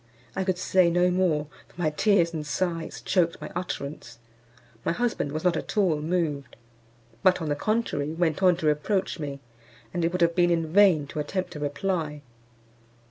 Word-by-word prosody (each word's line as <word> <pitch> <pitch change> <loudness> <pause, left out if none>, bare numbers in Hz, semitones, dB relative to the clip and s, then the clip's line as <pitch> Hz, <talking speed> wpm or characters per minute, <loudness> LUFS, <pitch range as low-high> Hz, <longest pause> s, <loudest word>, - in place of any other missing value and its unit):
I 190 - 0
could 185 -1 0
say 185 -1 +3
no 175 +1 +3
more, 175 -5 +1 0.2
for - - -19
my 155 -3 +1
tears 170 0 +2
and 155 -2 -3
sighs 165 +2 -3
choked 170 -3 +1
my - - -7
utterance. 145 -8 -5 0.7
My - - 0
husband 225 -9 -1
was 155 +2 -4
not 180 -2 +3
at 215 - -5
all 180 -7 +3
moved, 155 -5 -2 0.7
but, 185 -1 +4
on 160 -3 -3
the 145 - +1
contrary, 215 -5 -1
went 165 0 0
on 180 -2 +5
to 160 - -4
reproach 165 +6 0
me; 140 -2 -5 0.5
and 175 - -1
it 165 - +1
would 180 0 -2
have 170 0 +4
been 175 0 +3
in 165 -1 +1
vain 190 -7 +5
to 145 - -6
attempt 180 +3 -3
a - - -5
reply. 150 0 -2
170 Hz, 185 wpm, -26 LUFS, 150-185 Hz, 0.7 s, on